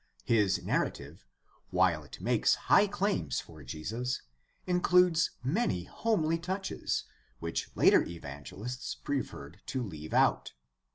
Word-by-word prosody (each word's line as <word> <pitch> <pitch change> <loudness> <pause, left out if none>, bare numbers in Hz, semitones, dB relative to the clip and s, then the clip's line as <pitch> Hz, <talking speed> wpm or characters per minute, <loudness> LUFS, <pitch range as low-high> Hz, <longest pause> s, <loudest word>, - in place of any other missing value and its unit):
His 105 -4 +2
narrative, - - -2 0.4
while 90 -4 +2
it 75 - -11
makes - - +3
high 205 - +4
claims 195 - 0
for 80 -3 -11
Jesus, 110 - -3 0.4
includes 180 -1 +4
many 135 - 0
homely 165 - 0
touches 190 +3 -2 0.3
which 85 +4 -3
later - - +6
evangelists 85 - -6
preferred 105 - -4
to 130 -2 -2
leave 80 -7 -7
out. - - +3
115 Hz, 110 wpm, -31 LUFS, -, 0.4 s, later